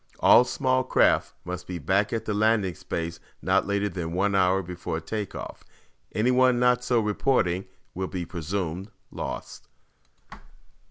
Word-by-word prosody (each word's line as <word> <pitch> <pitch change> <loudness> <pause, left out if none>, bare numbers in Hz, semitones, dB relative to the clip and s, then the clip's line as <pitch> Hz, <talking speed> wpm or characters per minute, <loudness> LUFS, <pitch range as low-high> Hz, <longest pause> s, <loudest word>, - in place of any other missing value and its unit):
All - - +7
small 130 0 +1
craft - - +2
must 90 0 -6
be 90 - -4
back 95 +7 +1
at 115 -1 -2
the 105 - -1
landing 105 -3 +2
space 85 -2 -5 0.2
not - - +1
later 100 0 0
than 85 -3 -4
one 100 +3 +1
hour 95 0 +3
before 85 -2 -4
take 105 +5 -5
off. - - -7 0.5
Anyone 125 +2 +4
not 125 0 +3
so 125 -1 +2
reporting 105 -4 +1 0.3
will 95 +1 -3
be 90 -2 -4
presumed 90 +2 -4 0.2
lost." - - -6
95 Hz, 145 wpm, -26 LUFS, 90-110 Hz, 0.5 s, All